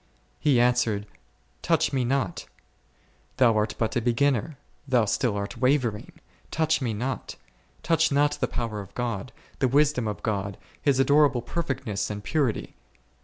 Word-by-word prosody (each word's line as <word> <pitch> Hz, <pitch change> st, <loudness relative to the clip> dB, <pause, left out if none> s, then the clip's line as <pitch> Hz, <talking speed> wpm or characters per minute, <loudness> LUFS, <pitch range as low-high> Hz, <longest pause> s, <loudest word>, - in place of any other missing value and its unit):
He 140 Hz, -5 st, +3 dB
answered, 120 Hz, -4 st, +2 dB, 0.6 s
Touch -, -, +1 dB
Me 130 Hz, -2 st, +1 dB
not; 120 Hz, -7 st, -1 dB, 0.9 s
thou 120 Hz, -4 st, +5 dB
art 105 Hz, 0 st, 0 dB
but 110 Hz, +2 st, -1 dB
a 120 Hz, -, +1 dB
beginner, 125 Hz, +3 st, +1 dB, 0.3 s
thou 125 Hz, -4 st, +3 dB
still 110 Hz, 0 st, 0 dB
art 100 Hz, 0 st, -5 dB
wavering: 125 Hz, -5 st, +1 dB, 0.4 s
Touch 160 Hz, -2 st, +1 dB
Me 120 Hz, -3 st, -1 dB
not; 120 Hz, +4 st, -4 dB, 0.5 s
touch 160 Hz, -1 st, +2 dB
not 145 Hz, +1 st, +3 dB
the -, -, +2 dB
power 115 Hz, -3 st, -3 dB
of 100 Hz, 0 st, -13 dB
God, 120 Hz, -1 st, -3 dB, 0.3 s
the 130 Hz, -, +3 dB
wisdom 140 Hz, -2 st, +2 dB
of 105 Hz, -, -5 dB
God, 100 Hz, -3 st, -2 dB, 0.2 s
His 140 Hz, -3 st, +2 dB
adorable 140 Hz, -3 st, +4 dB
perfectness 120 Hz, -, -3 dB
and 105 Hz, -1 st, -5 dB
purity. 140 Hz, -7 st, -1 dB
125 Hz, 145 wpm, -26 LUFS, 110-140 Hz, 0.9 s, thou